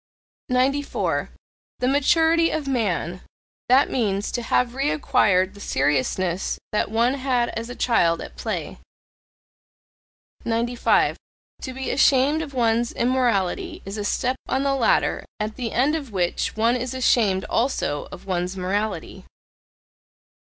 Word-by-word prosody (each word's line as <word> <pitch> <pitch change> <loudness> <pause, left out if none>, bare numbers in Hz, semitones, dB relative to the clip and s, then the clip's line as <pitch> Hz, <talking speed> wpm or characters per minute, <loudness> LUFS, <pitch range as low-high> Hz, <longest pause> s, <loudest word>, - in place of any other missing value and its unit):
94. 270 +3 0 0.5
The 250 - 0
maturity 325 +4 +3
of 310 -3 -3
man 185 - -1 0.5
that 265 +3 +5
means, 205 -5 -1
to 240 - -2
have 240 +1 +1
reacquired 250 -9 +2
the 200 - -14
seriousness 170 +3 0
that 210 - 0
one 230 +4 +2
had 255 -3 0
as 230 +1 -5
a 245 - -6
child 170 -9 +2
at - - -9
play. - - -4 1.6
95. 235 +1 +1 0.4
To 260 - -5
be 265 +1 -3
ashamed 280 +3 +3
of 285 -4 -7
one's 235 -1 +1
immorality 255 - 0
is 195 +2 -5
a - - -2
step 250 +5 0
on 265 +1 0
the 275 -1 +1
ladder 260 -4 +2 0.2
at 215 +1 -3
the 240 -4 -4
end 270 +5 +2
of 285 -7 -5
which 180 -3 -1
one 230 +2 +3
is 250 +1 -3
ashamed 215 -7 +2
also 225 - -1
of - - -10
one's 180 0 -2
morality. 200 +4 -3
240 Hz, 130 wpm, -23 LUFS, 200-265 Hz, 1.6 s, that